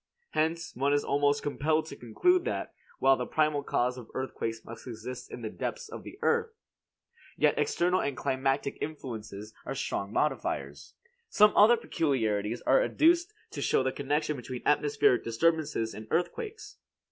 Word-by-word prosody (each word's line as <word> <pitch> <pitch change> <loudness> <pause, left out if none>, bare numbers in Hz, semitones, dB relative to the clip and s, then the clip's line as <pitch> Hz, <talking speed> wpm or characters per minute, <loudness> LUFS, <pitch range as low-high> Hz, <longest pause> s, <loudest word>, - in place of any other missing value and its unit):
Hence, 160 +2 -1
one 140 +3 +1
is 145 - +2
almost 145 0 +1
compelled 155 +2 0
to - - -8
conclude 360 - +2
that, - - -3 0.2
while 135 0 +5
the 125 -1 -4
primal 155 -2 +1
cause 125 -2 0
of 115 - -12
earthquakes 115 -3 -4
must 115 +2 -10
exist 120 +1 -7
in 120 - -7
the 110 - -3
depths 485 -3 -5
of - - -7
the - - -11
earth, 465 -1 +1 0.8
yet - - +4
external 180 +2 +2
and 140 -2 -2
climatic 135 +1 -1
influences 110 -8 -6
are - - -5
strong 100 0 -3
modifiers. 150 +6 -2 0.3
Some 210 - +5
other 225 +4 +7
peculiarities 115 - -1
are - - +4
adduced 345 -4 +3 0.2
to - - -5
show - - +2
the 130 - 0
connection 150 +3 -1
between 125 -1 -7
atmospheric 145 -4 +3
disturbances 145 -1 0
and 110 +1 -9
earthquakes. 435 - -3
145 Hz, 155 wpm, -29 LUFS, 120-165 Hz, 0.8 s, other